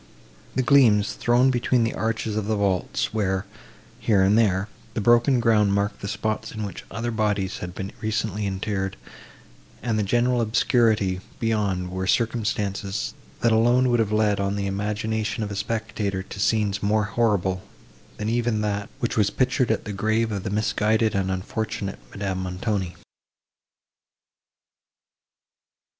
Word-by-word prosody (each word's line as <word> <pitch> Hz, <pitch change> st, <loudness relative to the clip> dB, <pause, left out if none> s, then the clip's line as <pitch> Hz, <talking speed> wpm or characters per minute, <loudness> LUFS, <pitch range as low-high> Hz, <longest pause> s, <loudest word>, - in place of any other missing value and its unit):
The 130 Hz, -, +2 dB
gleams, 120 Hz, -7 st, +5 dB
thrown 125 Hz, +2 st, +3 dB
between 120 Hz, -1 st, +2 dB
the 115 Hz, -, 0 dB
arches 110 Hz, -1 st, -2 dB
of 105 Hz, -1 st, -2 dB
the 110 Hz, -, +1 dB
vaults, 100 Hz, -2 st, 0 dB
where, 95 Hz, -3 st, 0 dB, 0.5 s
here 100 Hz, -4 st, +3 dB
and 100 Hz, +2 st, +4 dB
there, 100 Hz, -3 st, +2 dB, 0.3 s
the -, -, 0 dB
broken 120 Hz, +4 st, +4 dB
ground 105 Hz, -4 st, +3 dB
marked 100 Hz, +1 st, -1 dB
the 100 Hz, -, -4 dB
spots 110 Hz, +1 st, -2 dB
in 110 Hz, -1 st, -5 dB
which 100 Hz, -, -6 dB
other 115 Hz, +3 st, -3 dB
bodies 105 Hz, -4 st, -1 dB
had 90 Hz, 0 st, -6 dB
been 95 Hz, +1 st, -5 dB
recently 105 Hz, -1 st, -1 dB
interred, 95 Hz, 0 st, -2 dB, 0.9 s
and 110 Hz, -3 st, 0 dB
the -, -, +3 dB
general 120 Hz, +4 st, +2 dB
obscurity 110 Hz, -4 st, +2 dB, 0.2 s
beyond 100 Hz, -5 st, 0 dB
were 95 Hz, 0 st, -3 dB
circumstances, 105 Hz, -3 st, -1 dB, 0.3 s
that 115 Hz, -, +3 dB
alone 120 Hz, +3 st, +4 dB
would 120 Hz, -, +3 dB
have 110 Hz, -2 st, +1 dB
led 105 Hz, -2 st, +2 dB
on 100 Hz, 0 st, 0 dB
the 100 Hz, -1 st, -2 dB
imagination 105 Hz, +2 st, -2 dB
of 105 Hz, -, -4 dB
a -, -, -4 dB
spectator 105 Hz, -2 st, -2 dB
to 100 Hz, -, -9 dB
scenes 105 Hz, -1 st, +1 dB
more 105 Hz, +1 st, +2 dB
horrible 100 Hz, -4 st, +1 dB, 0.6 s
than 105 Hz, -, -3 dB
even 115 Hz, -1 st, +1 dB
that 105 Hz, +1 st, -2 dB
which 120 Hz, -, -1 dB
was 105 Hz, -3 st, +3 dB
pictured 130 Hz, +1 st, +1 dB
at 110 Hz, -, 0 dB
the 105 Hz, -, -4 dB
grave 110 Hz, +3 st, +1 dB
of 100 Hz, -2 st, -2 dB
the -, -, -4 dB
misguided 110 Hz, +1 st, +1 dB
and 95 Hz, -1 st, 0 dB
unfortunate 100 Hz, -, -3 dB
Madame 95 Hz, +1 st, -3 dB
Montoni. 95 Hz, 0 st, -2 dB
105 Hz, 150 wpm, -24 LUFS, 100-115 Hz, 0.9 s, gleams